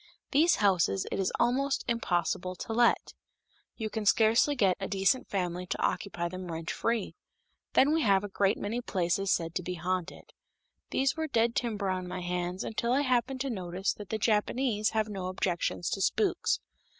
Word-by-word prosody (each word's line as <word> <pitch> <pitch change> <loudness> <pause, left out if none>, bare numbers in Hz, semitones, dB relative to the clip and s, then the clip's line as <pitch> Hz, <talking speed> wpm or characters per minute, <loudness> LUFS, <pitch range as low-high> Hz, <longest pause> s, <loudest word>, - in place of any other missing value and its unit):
These 315 +5 +5
houses 195 -1 +2
it - - -2
is 190 - +1
almost 270 +3 +1
impossible 185 -5 -1
to 225 - -5
let; 235 +1 +2 0.6
you 220 - -3
can 215 -1 -3
scarcely 230 +7 +4
get 195 -7 +3
a 195 - -3
decent 195 +6 +1
family 180 -2 -2
to - - -3
occupy 175 -4 -1
them 185 0 -6
rent 165 0 -4
free. 230 -3 -1 0.6
Then 275 +3 +5
we 325 - +2
have 200 -5 +3
a - - -3
great 195 0 +1
many 225 +4 -3
places 190 -2 0
said 165 -1 0
to 180 - -1
be 180 +1 -4
haunted. 180 +1 -4 0.6
These 270 +1 +1
were 320 -1 -2
dead 230 -4 +2
timber 210 -6 -1
on 185 -1 -3
my 180 0 -5
hands 180 +1 -2
until 235 +2 -2
I 275 - +3
happened 255 -1 0
to 270 -1 -1
notice 185 -2 -2
that 205 -2 -10
the 220 - -1
Japanese 215 +1 +1
have 220 -1 0
no 195 -3 -4
objections 175 -2 -1
to 195 - -2
spooks. 395 - +1
200 Hz, 180 wpm, -30 LUFS, 180-235 Hz, 0.6 s, These